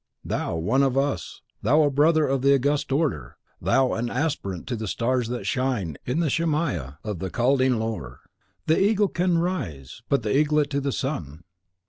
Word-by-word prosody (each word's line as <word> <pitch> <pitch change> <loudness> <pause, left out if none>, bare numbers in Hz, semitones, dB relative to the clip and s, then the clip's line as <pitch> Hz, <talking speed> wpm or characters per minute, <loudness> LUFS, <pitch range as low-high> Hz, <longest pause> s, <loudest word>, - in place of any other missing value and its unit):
THOU - - -2
one 110 +12 +1
of 135 -1 +2
us; 135 - -2 0.2
thou 150 +8 +4
a 145 - +2
brother 155 +3 +4
of 135 -1 0
the 140 +1 +5
August 145 +2 0
Order; 135 - -1 0.2
thou 135 -1 +2
an 120 +1 -2
Aspirant 125 - -2
to 125 - -3
the 110 -1 -4
Stars 125 +3 0
that 120 0 -4
shine 125 - -1
in 135 +7 0
the 160 - +1
Shemaia 150 - -1
of 105 -5 -4
the 95 - -3
Chaldean 130 +2 +2
lore! 100 - -4 0.4
The 160 - +3
eagle 205 0 +3
can 175 0 +1
raise 85 - -3
but 140 -4 +2
the 105 +2 0
eaglet 150 0 +2
to 140 0 0
the 140 0 -1
sun. 85 - -4
135 Hz, 180 wpm, -25 LUFS, 110-150 Hz, 0.4 s, the